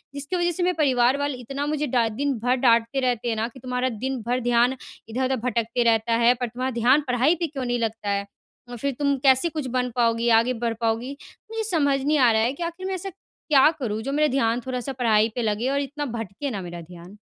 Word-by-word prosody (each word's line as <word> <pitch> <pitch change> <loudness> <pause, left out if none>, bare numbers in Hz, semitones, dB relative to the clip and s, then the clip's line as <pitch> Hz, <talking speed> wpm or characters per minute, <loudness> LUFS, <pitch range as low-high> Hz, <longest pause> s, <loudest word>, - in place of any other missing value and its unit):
जिसकी 285 +6 -3
वजह 350 0 +1
से 350 +1 -1
मेरे 360 +1 +2
परिवार 260 -3 +3
वाले 285 -2 -2
इतना 275 +4 -5
मुझे 300 -1 -1
डा 240 -2 +2
दिन 280 +6 -1
भर 250 +1 +3
डाँटते 235 0 +2
रहते 245 -2 -1
हैं 225 - 0
ना 220 +1 -1
कि 255 +2 -13
"तुम्हारा 250 +1 -2
दिन 255 +2 -4
भर 250 +1 +1
ध्यान 245 +1 +2 0.3
इधर-उधर 260 +3 0
भटकते 235 0 0
रहता 230 0 +2
है, 235 +1 +5
पर 250 0 -3
तुम्हारा 255 +3 -3
ध्यान 260 +6 +4
पढ़ाई 255 +6 +3
पे 340 0 -2
क्यों 275 -4 -5
नहीं 245 0 -1
लगता 225 -2 -3
है? 200 0 -1 0.4
और 245 - -7
फिर 280 +4 -2
तुम 280 -1 +2
कैसे 265 +4 +4
कुछ 305 -4 -4
बन 250 0 0
पाओगी? 235 -1 +2
आगे 230 +2 +4
बढ़ 230 -1 +1
पाओगी?" 230 +3 -1 0.4
मुझे 450 0 -2
समझ 285 -6 +2
नहीं 300 +2 +2
आ 245 -3 +5
रहा 220 - +2
है 240 +4 +1
कि 340 - -6
आखिर 345 +3 -5
मैं 385 - -2
ऐसा 380 +2 -4
क्या 305 -6 +2
करूँ 220 -5 -3
जो 270 +5 -4
मेरा 300 +2 +2
ध्यान 240 -2 +1
थोड़ा 255 -1 -2
सा 270 +2 -3
पढ़ाई 225 -3 +2
पे 245 - -1
लगे 220 +3 -1
और 280 +1 0
इतना 290 +2 -4
भटके 225 +6 -5
ना 200 -4 -4
मेरा 175 -1 -7
ध्यान। 175 +4 -13
250 Hz, 240 wpm, -24 LUFS, 230-280 Hz, 0.4 s, है